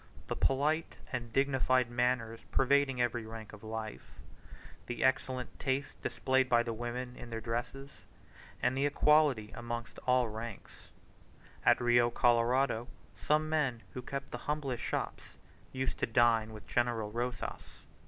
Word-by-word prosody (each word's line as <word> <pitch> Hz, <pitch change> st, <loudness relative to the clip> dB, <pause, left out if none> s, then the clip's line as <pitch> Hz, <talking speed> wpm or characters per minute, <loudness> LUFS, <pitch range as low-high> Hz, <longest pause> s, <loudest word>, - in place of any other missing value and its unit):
The -, -, -1 dB
polite 150 Hz, +4 st, +1 dB, 0.2 s
and 120 Hz, -2 st, -3 dB
dignified 130 Hz, -2 st, +2 dB
manners 120 Hz, -2 st, 0 dB
pervading 135 Hz, -1 st, +3 dB
every 120 Hz, -1 st, +1 dB
rank 110 Hz, -1 st, -9 dB
of 105 Hz, -, -11 dB
life, 110 Hz, -1 st, -6 dB, 0.7 s
the 120 Hz, -, -3 dB
excellent 130 Hz, -1 st, 0 dB
taste 135 Hz, +1 st, -2 dB
displayed 130 Hz, -1 st, +1 dB
by 120 Hz, -1 st, +5 dB
the 115 Hz, -1 st, -3 dB
women 120 Hz, +2 st, -4 dB
in 120 Hz, -, -9 dB
their 115 Hz, -1 st, -3 dB
dresses, 120 Hz, +5 st, -4 dB, 0.7 s
and 125 Hz, +1 st, +2 dB
the 140 Hz, +2 st, +2 dB
equality 145 Hz, -6 st, +3 dB
amongst 120 Hz, 0 st, -5 dB
all 125 Hz, -1 st, +4 dB
ranks. 110 Hz, 0 st, -8 dB, 0.8 s
At -, -, +6 dB
the -, -, -5 dB
Rio 120 Hz, 0 st, +5 dB
Colorado 120 Hz, 0 st, +2 dB, 0.3 s
some 155 Hz, +1 st, +1 dB
men 140 Hz, -7 st, 0 dB
who 125 Hz, -, -5 dB
kept 140 Hz, +2 st, -5 dB
the 120 Hz, -, -4 dB
humblest 140 Hz, -5 st, -1 dB
shops -, -, -4 dB, 0.3 s
used 130 Hz, 0 st, -2 dB
to -, -, +1 dB
dine 115 Hz, -1 st, +3 dB
with 110 Hz, -1 st, -10 dB
General 120 Hz, -3 st, 0 dB
Rosas. 120 Hz, +2 st, -5 dB
120 Hz, 145 wpm, -32 LUFS, 115-130 Hz, 0.8 s, At